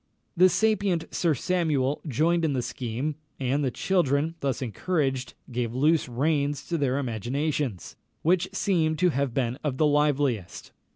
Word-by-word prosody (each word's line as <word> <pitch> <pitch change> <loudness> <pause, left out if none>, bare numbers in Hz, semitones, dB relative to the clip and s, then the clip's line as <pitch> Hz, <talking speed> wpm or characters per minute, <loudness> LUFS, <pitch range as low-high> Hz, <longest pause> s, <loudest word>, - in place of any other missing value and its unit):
The 185 +1 +6
sapient 195 -2 +1
Sir 165 -4 +2
Samuel 150 -4 0
joined 165 +6 +2
in 155 -3 +1
the 125 -2 -1
scheme; 125 +6 -3 0.2
and 135 +2 0
the 135 - +1
children, 160 0 +1
thus 135 -3 -1
encouraged, 135 - -2 0.2
gave 120 -1 -2
loose 150 +2 +2
reins 145 +2 0
to 170 - 0
their 135 -2 +1
imaginations, 130 - -2 0.3
which 180 +3 +2
seem 170 -5 +1
to 180 +3 +3
have 140 -5 -1
been 125 -1 -1
of 140 -4 -1
the 155 - +3
liveliest. 145 -9 0
145 Hz, 150 wpm, -26 LUFS, 130-165 Hz, 0.3 s, The